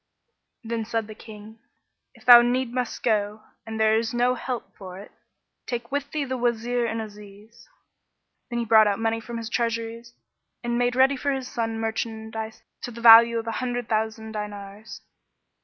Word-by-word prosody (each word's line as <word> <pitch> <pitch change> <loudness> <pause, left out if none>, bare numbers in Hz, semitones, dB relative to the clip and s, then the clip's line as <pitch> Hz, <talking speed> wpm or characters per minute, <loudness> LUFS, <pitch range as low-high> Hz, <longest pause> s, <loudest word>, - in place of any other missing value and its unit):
"[FN#11] - - -9
Then 225 -1 -2
said 225 0 -2
the 215 - -10
King, 215 0 -13 0.6
"If - - -20
thou 240 -1 +10
need 245 0 0
must 250 -2 -3
go 210 -1 0 0.2
and 220 0 -5
there 220 0 +4
is 230 +1 -4
no 245 +1 +2
help 250 -1 -6
for 185 -2 -10
it, 200 - -12 0.6
take 235 0 -5
with 285 0 -2
thee 300 -2 -2
the 260 -1 -3
Wazir 240 0 0
and 225 0 -3
Aziz." 210 +1 -12 0.8
Then 240 - -3
he 235 - -1
brought 220 -1 +6
out 200 -1 0
money 225 +1 -1
from 235 +1 -7
his 230 -1 -5
treasuries 230 0 -3 0.5
and 240 0 -1
made 245 0 +1
ready 265 +2 +4
for 280 +2 -1
his 265 -2 -3
son 225 -2 -3
merchandise 220 0 -5 0.2
to - - -5
the 235 -1 -10
value 230 0 +8
of 225 - -3
an 230 - -3
hundred 245 -2 -3
thousand 220 0 -2
dinars. 210 0 -8
230 Hz, 180 wpm, -25 LUFS, 220-240 Hz, 0.8 s, thou